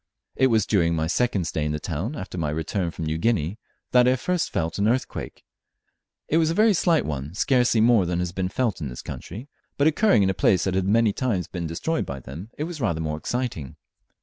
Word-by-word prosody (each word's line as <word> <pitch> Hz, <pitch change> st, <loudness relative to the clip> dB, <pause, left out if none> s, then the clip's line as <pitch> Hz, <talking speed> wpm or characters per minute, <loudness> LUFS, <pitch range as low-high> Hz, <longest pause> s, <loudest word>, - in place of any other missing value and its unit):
It 130 Hz, -, +4 dB
was 115 Hz, -3 st, +2 dB
during 85 Hz, -5 st, +2 dB
my 80 Hz, 0 st, 0 dB
second 100 Hz, +1 st, 0 dB
stay 80 Hz, -, -2 dB
in 75 Hz, 0 st, -1 dB
the 75 Hz, -, -2 dB
town, 90 Hz, -, -4 dB
after 95 Hz, -7 st, -7 dB
my 80 Hz, -4 st, -1 dB
return 80 Hz, +4 st, -2 dB
from 85 Hz, -1 st, -6 dB
New 80 Hz, +1 st, -2 dB
Guinea, 105 Hz, -1 st, 0 dB, 0.3 s
that 125 Hz, 0 st, +5 dB
I 130 Hz, -, +4 dB
first 180 Hz, +6 st, -1 dB
felt 80 Hz, +3 st, -2 dB
an 100 Hz, -, +2 dB
earthquake. 125 Hz, +3 st, -2 dB, 0.8 s
It 160 Hz, -, +2 dB
was 160 Hz, -1 st, +3 dB
a 165 Hz, -, -1 dB
very 215 Hz, +1 st, +5 dB
slight 170 Hz, -3 st, +2 dB
one, 75 Hz, +2 st, -4 dB
scarcely 125 Hz, -1 st, +3 dB
more 115 Hz, -5 st, +4 dB
than 85 Hz, 0 st, -1 dB
has 90 Hz, 0 st, -1 dB
been 95 Hz, 0 st, -2 dB
felt 115 Hz, -4 st, -1 dB
in 70 Hz, -, -3 dB
this -, -, -8 dB
country, 115 Hz, +7 st, -8 dB, 0.3 s
but 140 Hz, -, +3 dB
occurring 160 Hz, -, +4 dB
in 95 Hz, -, +2 dB
a -, -, -2 dB
place 95 Hz, 0 st, +2 dB
that 95 Hz, -, 0 dB
lad 95 Hz, 0 st, 0 dB
been 100 Hz, -, +1 dB
many 115 Hz, -1 st, +3 dB
times 105 Hz, -, -1 dB
destroyed 85 Hz, -, -2 dB
by 70 Hz, -1 st, -5 dB
them 75 Hz, -, -9 dB
it 150 Hz, -, -2 dB
was 165 Hz, -2 st, -6 dB
rather 85 Hz, -9 st, 0 dB
more 75 Hz, -1 st, -2 dB
exciting. 120 Hz, -, -3 dB
95 Hz, 230 wpm, -24 LUFS, 80-125 Hz, 0.8 s, that